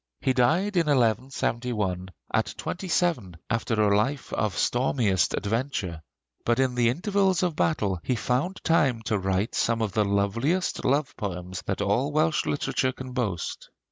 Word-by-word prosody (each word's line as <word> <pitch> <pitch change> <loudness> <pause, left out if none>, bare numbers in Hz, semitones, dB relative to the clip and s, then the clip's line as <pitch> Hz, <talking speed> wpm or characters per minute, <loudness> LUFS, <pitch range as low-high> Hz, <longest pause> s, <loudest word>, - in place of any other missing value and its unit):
He 130 - +1
died 175 +11 +2
in 165 -2 +3
1171 115 -6 0 0.2
at - - 0
twenty 185 +2 -4
seven, 155 - 0
after 115 -1 0
a 105 -1 +4
life 135 +6 -1
of 105 -3 -1
stormiest 120 -6 +1
adventure; 105 - -2 0.4
but 120 0 +2
in 130 -1 +2
the 120 -1 +3
intervals 190 - +1
of 175 -3 0
battle 100 - 0
he 125 - 0
found 130 - -1
time 135 -9 +2
to 110 -2 0
write 95 +3 0
some 115 -1 +1
of 110 -3 -1
the 105 - +3
loveliest 105 - 0
love 145 +2 +1
poems 90 -2 -4
that 100 +1 -1
all 115 +9 +1
Welsh 155 +1 +1
literature 130 -2 0
can 130 0 -8
boast. 110 - -3
120 Hz, 155 wpm, -26 LUFS, 100-145 Hz, 0.4 s, a